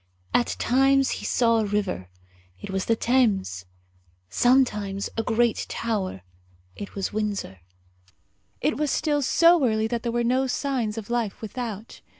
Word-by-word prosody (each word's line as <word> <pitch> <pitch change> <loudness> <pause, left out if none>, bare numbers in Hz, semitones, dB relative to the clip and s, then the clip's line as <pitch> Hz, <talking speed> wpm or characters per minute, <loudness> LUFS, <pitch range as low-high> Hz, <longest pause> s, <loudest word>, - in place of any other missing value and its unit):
At 240 - +2
times 270 +2 +3
he - - -7
saw 230 -2 +2
a 220 - 0
river 200 - -2 0.5
it 145 - -7
was 190 -1 -2
the 230 - +2
Thames; 205 - +1 0.7
sometimes 210 - +2
a 225 - 0
great 235 0 +1
tower 200 - -3 0.5
it 200 - -8
was 195 0 -3
Windsor. 205 - -3 1.0
It - - 0
was 300 0 0
still 295 -1 +1
so 335 +4 +4
early 220 -3 +2
that 235 +1 -2
there 235 - -2
were 240 0 0
no 255 +3 +1
signs 250 -5 -2
of 225 +1 -6
life 235 -4 -1
without. 220 -1 -6
230 Hz, 150 wpm, -25 LUFS, 205-255 Hz, 1.0 s, so